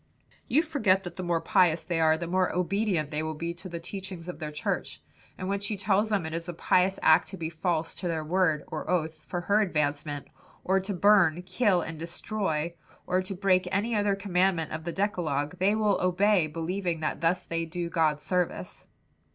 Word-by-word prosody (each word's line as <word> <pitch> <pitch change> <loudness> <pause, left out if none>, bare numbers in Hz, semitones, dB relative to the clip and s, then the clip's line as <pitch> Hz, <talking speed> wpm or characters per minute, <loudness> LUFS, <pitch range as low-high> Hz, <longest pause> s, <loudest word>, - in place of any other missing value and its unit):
"You 300 +6 +3
forget 195 - +2
that 175 -1 -7
the - - -5
more 175 -2 0
pious 175 -3 +3
they 170 -2 -1
are, 160 0 +4
the 170 - -4
more 185 +2 +1
obedient 180 -3 0
they 150 0 -1
will 155 0 -3
be 170 +2 -3
to 185 +2 -9
the 170 -1 -5
teachings 185 -1 -7
of 180 - -6
their 155 -2 -4
church, 150 - -3 0.4
and 185 - -4
when 200 +1 0
she 205 +1 -3
tells 205 +2 +2
them 200 -6 0
it 160 - -5
is 165 +1 -4
a 175 - -5
pious 185 +3 +2
act 160 +2 +5
to 190 - -8
be 165 -1 -4
false 165 0 -1
to 180 - -5
their 160 -2 -1
word 160 -2 +1
or 155 - -5
oath, 160 -3 -1
for 175 - -3
her 205 +4 +3
advancement, 145 -5 -1 0.4
or 190 +1 +2
to 195 +1 -4
burn, 180 -3 +4
kill 190 -3 +2
and 165 -1 -7
destroy, 170 -1 -2 0.3
or 185 +1 +1
to 185 +1 -5
break 185 -1 +2
any 215 +5 0
other 205 -1 +2
commandment 185 -4 +1
of 160 +1 -5
the 170 - -2
decalogue, 175 -5 -1
they 200 +3 +3
will 210 -2 +2
obey 185 -1 +3
believing 170 +2 -3
that 155 - -2
thus 175 +2 +1
they 165 0 -2
do 170 +1 -4
God 160 -3 +1
service. 175 - -2
175 Hz, 205 wpm, -28 LUFS, 160-195 Hz, 0.4 s, act